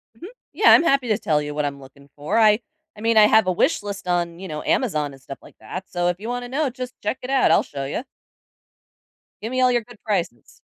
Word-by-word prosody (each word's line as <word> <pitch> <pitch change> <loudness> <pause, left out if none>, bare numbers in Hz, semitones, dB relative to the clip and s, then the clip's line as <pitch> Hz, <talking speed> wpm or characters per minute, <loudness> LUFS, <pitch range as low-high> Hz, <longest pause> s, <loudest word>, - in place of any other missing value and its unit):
Mhm. 340 - -10 0.3
Yeah, - - +5
I'm - - +7
happy 275 -6 +2
to 215 - +2
tell 150 -2 0
you 145 0 -5
what 150 0 -1
I'm 140 -1 -4
looking 140 +1 -17
for, 150 +9 -2
I 215 -1 +5 0.4
I - - -11
mean, 230 +1 +1
I 215 -1 +7
have 220 -1 +4
a 185 - +1
wish 180 - +1
list 200 -2 -6
on, 175 -1 -1
you 190 - -7
know, 150 -2 -6
Amazon 155 - 0
and 135 - -16
stuff 135 0 -9
like - - -16
that, 185 - -7
so, 175 -1 -1
if 175 0 -1
you 215 - -7
wanna 245 0 -4
know, 285 +2 0
just 255 0 -7
check 210 +5 -2
it 255 - -7
out, 270 -1 +3
I'll - - +4
show 140 -1 -6
you. 145 - -4 1.4
Give 225 - -4
me 255 0 0
all 255 - +4
your 240 -1 +1
good 235 -1 -17
prices. 180 - -4
205 Hz, 250 wpm, -22 LUFS, 150-245 Hz, 1.4 s, I'm